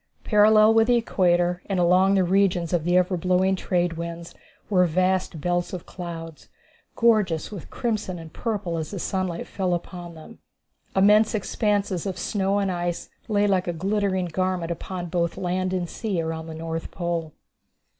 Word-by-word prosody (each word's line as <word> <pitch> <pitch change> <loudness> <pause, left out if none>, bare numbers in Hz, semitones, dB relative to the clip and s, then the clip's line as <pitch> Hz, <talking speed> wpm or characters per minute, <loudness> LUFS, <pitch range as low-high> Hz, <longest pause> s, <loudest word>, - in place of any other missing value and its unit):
Parallel 215 0 +5
with 225 0 +4
the 245 - +4
Equator 180 -5 +1
and 195 -2 -1
along 185 +3 +4
the 190 - +4
regions 180 -2 +1
of 165 -3 +1
the 175 +1 +3
ever 180 +1 +2
blowing 185 +2 +2
trade 175 -2 -1
winds, 170 0 -6 0.3
were 180 -3 +3
vast 185 0 0
belts 175 +3 -1
of 180 - -6
clouds, 165 -3 -8 0.5
gorgeous 215 -9 +2
with 200 -6 -8
crimson 215 -6 -2
and 165 -1 -10
purple 200 -7 -2
as 155 - -4
the 200 - -6
sunlight 185 -1 -2
fell 185 -3 -1
upon 175 -1 -7
them. 160 +9 -13 0.6
Immense 210 +3 +5
expanses 205 -3 -1
of 190 - -4
snow 195 -1 0
and 200 -2 0
ice 175 -1 -3 0.2
lay 205 -2 +2
like 190 -3 +1
a 175 - -1
glittering 190 +1 0
garment 180 0 -1
upon 175 +1 -5
both 170 -1 -1
land 185 +1 -1
and 180 -2 -1
sea 200 -1 -3
around 160 0 -3
the 160 - -7
North 165 0 -5
Pole. 170 -3 -3
180 Hz, 165 wpm, -24 LUFS, 170-200 Hz, 0.6 s, Parallel